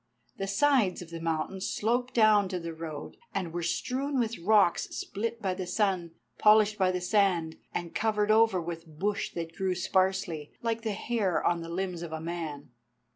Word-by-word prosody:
The 195 - -3
sides 210 -3 +2
of 165 - -14
the 165 - -5
mountain 165 +3 -2
sloped 245 +6 -1
down 215 -4 +5
to 185 -2 -2
the 165 -1 -5
road, 160 -2 -7 0.2
and 175 -4 -2
were 175 - -2
strewn 260 - -1
with 230 -3 -1
rocks 200 0 +3
split 230 +3 -4
by 190 -2 +1
the 185 -1 -5
sun, 180 -4 0 0.2
polished 210 0 +5
by 185 -1 +4
the 180 - -1
sand, 180 -4 +1
and 170 -1 -4
covered 215 -1 +1
over 220 -3 +5
with 165 0 -6
bush 205 +4 -1
that 165 -1 -5
grew 190 -1 0
sparsely, 185 -4 0
like 230 -1 -1
the 220 -2 -2
hair 210 -3 0
on 170 -1 +2
the 165 - -7
limbs 180 0 -3
of 170 -2 -6
a 160 - -3
man. 160 -4 -5
190 Hz, 180 wpm, -29 LUFS, 170-215 Hz, 0.2 s, down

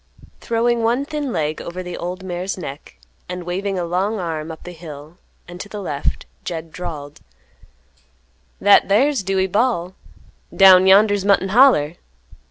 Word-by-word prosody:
Throwing 235 +1 0
one 240 +5 +1
thin 295 -3 -4
leg 155 -5 -2
over 180 +2 -6
the 180 -1 -6
old 180 +2 -6
mare's 185 +1 -4
neck, 140 - -9 0.3
and 180 0 -5
waving 190 +3 -3
a 175 - -2
long 190 +6 -1
arm 165 -3 -4
up 160 - -11
the 180 - -8
hill 160 0 -11 0.3
and 175 +1 -9
to 205 - -9
the 210 - -7
left, 145 -7 -3 0.2
Jed 165 -2 -6
drawled, 155 -5 -8 1.4
"That 205 0 +5
thar's 260 +5 +3
Dewey 190 0 0
Bal'; 190 -3 0 0.6
down 190 -1 +7
yonder's 205 0 +5
Mutton 195 -1 +2
Holler." 195 - +4
185 Hz, 150 wpm, -20 LUFS, 170-205 Hz, 1.4 s, down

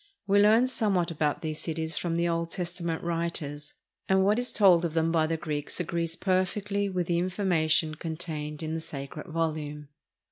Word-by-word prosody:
We 200 0 +4
learn 220 +4 +6
somewhat 200 -9 +1
about 150 -1 -1
these 155 -1 -2
cities 160 -1 -3
from 170 +1 -1
the 170 +1 +1
Old 170 0 -1
Testament 170 -2 -3
writers, 165 -4 -3 0.3
and 190 0 +4
what 210 +4 +3
is 245 - 0
told 185 -5 +5
of 165 -2 -2
them 165 0 +2
by 160 -1 +2
the 165 0 -1
Greeks 150 0 -4
agrees 170 -1 -2
perfectly 200 +2 0
with 180 -2 -1
the 170 0 +1
information 175 -3 +1
contained 155 -1 -5
in 155 0 -3
the 165 - -1
sacred 140 0 -7
volume. 155 -3 -3
165 Hz, 175 wpm, -28 LUFS, 155-185 Hz, 0.3 s, learn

